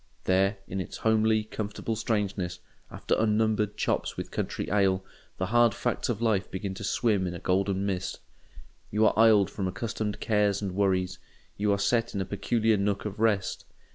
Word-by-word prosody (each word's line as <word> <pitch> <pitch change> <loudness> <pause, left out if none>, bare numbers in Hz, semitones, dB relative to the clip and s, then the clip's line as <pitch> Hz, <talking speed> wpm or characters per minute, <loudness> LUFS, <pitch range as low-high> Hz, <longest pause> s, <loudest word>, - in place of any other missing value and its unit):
There, 95 +2 +2
in 95 +1 -3
its - - -7
homely, 110 0 +2
comfortable 110 +1 -4
strangeness, 100 -5 -1 0.3
after - - -3
unnumbered 110 -1 +1
chops - - -1
with - - -5
country - - -3
ale, 95 -2 +2 0.3
the 95 - -1
hard 120 +3 +3
facts 120 0 -1
of 115 -1 -1
life 105 -4 +1
begin 95 +1 -4
to 100 - -8
swim 100 -2 +1
in 90 - -4
a - - -6
golden 95 +2 0
mist. 95 -2 -3 0.7
You 105 +1 +2
are - - +4
isled 110 -3 +5
from 95 -2 -2
accustomed 105 +1 -3
cares 105 -2 +2
and 100 -2 -3
worries—you 95 +1 -2
are 100 - +2
set 115 +3 +1
in - - -1
a - - -2
peculiar 110 +2 +1
nook 100 +1 -1
of 105 0 -5
rest. 105 -4 +1
100 Hz, 170 wpm, -28 LUFS, 95-110 Hz, 0.7 s, isled